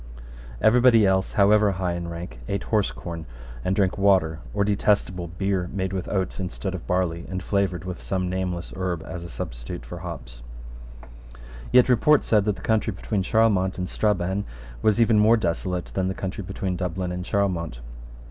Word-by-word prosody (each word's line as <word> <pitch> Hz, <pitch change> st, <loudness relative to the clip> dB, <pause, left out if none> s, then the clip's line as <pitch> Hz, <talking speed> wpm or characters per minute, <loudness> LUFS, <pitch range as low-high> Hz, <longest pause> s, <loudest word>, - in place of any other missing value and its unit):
Every 120 Hz, +3 st, +5 dB
body 115 Hz, -4 st, +6 dB
else, 95 Hz, 0 st, +1 dB
however 105 Hz, 0 st, +4 dB
high 90 Hz, -1 st, -1 dB
in 85 Hz, 0 st, -4 dB
rank, 85 Hz, -7 st, -7 dB
ate 100 Hz, -1 st, -2 dB
horsecorn, 85 Hz, -6 st, -2 dB, 0.4 s
and 95 Hz, -, 0 dB
drank 100 Hz, 0 st, +1 dB
water 95 Hz, -6 st, +3 dB
or 100 Hz, -, +1 dB
detestable 100 Hz, -3 st, +1 dB
beer, 90 Hz, +1 st, -1 dB
made 95 Hz, -1 st, -2 dB
with 95 Hz, -2 st, -3 dB
oats 95 Hz, -1 st, -2 dB
instead 95 Hz, +1 st, -4 dB
of 95 Hz, -, -7 dB
barley, 85 Hz, -2 st, -1 dB
and 95 Hz, -1 st, -4 dB
flavoured 95 Hz, -4 st, 0 dB
with 90 Hz, -1 st, -6 dB
some 95 Hz, -1 st, -1 dB
nameless 90 Hz, -1 st, -3 dB
herb 90 Hz, -3 st, -2 dB
as 90 Hz, -2 st, -6 dB
a 85 Hz, -, -8 dB
substitute -, -, -6 dB
for -, -, -7 dB
hops, -, -, -8 dB, 1.3 s
Yet 125 Hz, 0 st, +6 dB
report 135 Hz, +4 st, +4 dB
said 105 Hz, -3 st, +3 dB
that 105 Hz, -2 st, +1 dB
the -, -, -12 dB
country 110 Hz, 0 st, +1 dB
between 100 Hz, +1 st, -2 dB
Charlemont 100 Hz, -3 st, +2 dB
and 90 Hz, -1 st, -2 dB
Strabane 100 Hz, -1 st, 0 dB, 0.4 s
was 110 Hz, -, +3 dB
even 115 Hz, -2 st, +5 dB
more 110 Hz, +2 st, +6 dB
desolate 90 Hz, -2 st, -2 dB
than 95 Hz, -1 st, 0 dB
the 95 Hz, -, -2 dB
country 95 Hz, +2 st, -4 dB
between 90 Hz, 0 st, -3 dB
Dublin 90 Hz, 0 st, -2 dB
and 90 Hz, 0 st, -4 dB
Charlemont. 90 Hz, -10 st, -1 dB
95 Hz, 175 wpm, -24 LUFS, 90-100 Hz, 1.3 s, body